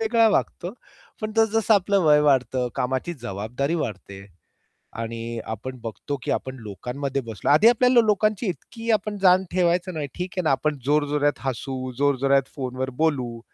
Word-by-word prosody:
वेगळा 225 +1 +3
वागतो. - - -1 0.5
पण 215 0 -3
जसं-जसं 225 -1 +3
आपलं 200 0 +2
वय 150 -1 +6
वाढतं, 130 -3 +2
कामाची 130 +7 -2
जबाबदारी 120 - -3
वाढते. 100 -2 -7 0.8
आणि 115 0 -4 0.3
आपण 130 +4 -6
बघतो, 115 +5 -5
की - - -3
आपण 130 0 -2
लोकांमध्ये 125 +6 -4
बसलो 110 -4 -3
आधी 155 +10 +7
आपल्याला 245 +1 +5
लोकांची 215 +1 +1
इतकी 225 +5 -5
आपण 210 -1 0
जाण 185 0 +5
ठेवायचो 180 0 +1
नाही. 155 -3 -3
ठीक 180 +1 -4
आहे 180 - 0
ना, 160 - +1
आपण 145 +2 0
जोरजोरात 145 0 +1
हसू, 130 0 -3
जोरजोरात 140 -1 +2
फोनवर 130 -1 -3
बोलू, 130 -7 0
145 Hz, 150 wpm, -24 LUFS, 130-190 Hz, 0.8 s, आधी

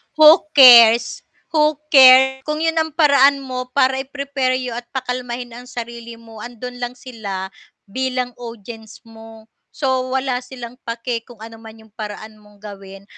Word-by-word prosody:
Who 310 +1 +6
cares, 235 -3 +6 0.2
who 305 -1 +1 0.2
cares, 265 -1 +6
kung 305 +1 -3
'yun 325 0 0
ang 320 -2 -3
paraan 280 -3 +3
mo 255 -1 -6
para 265 -1 +1
i-prepare 275 -1 -3
you 255 -1 -5
at 240 +1 -8
pakalmahin 250 -1 -5
ang 245 +2 -12
sarili 235 -1 -9
mo, 225 -1 -15
andun 245 +2 -9
lang 245 0 -6
sila 210 -7 -8 0.3
bilang 255 +3 -4
audience 225 -1 -11
mo, 225 -1 -15 0.3
so 260 -3 -2
wala 260 -1 -2
silang 250 -1 -12
pake 230 0 -5
kung 235 -3 -15
ano 225 0 -12
man 225 0 -15
'yung 220 - -23
paraan 215 0 -10
mong 210 0 -23
gawin 195 -1 -12
245 Hz, 155 wpm, -18 LUFS, 225-265 Hz, 0.3 s, Who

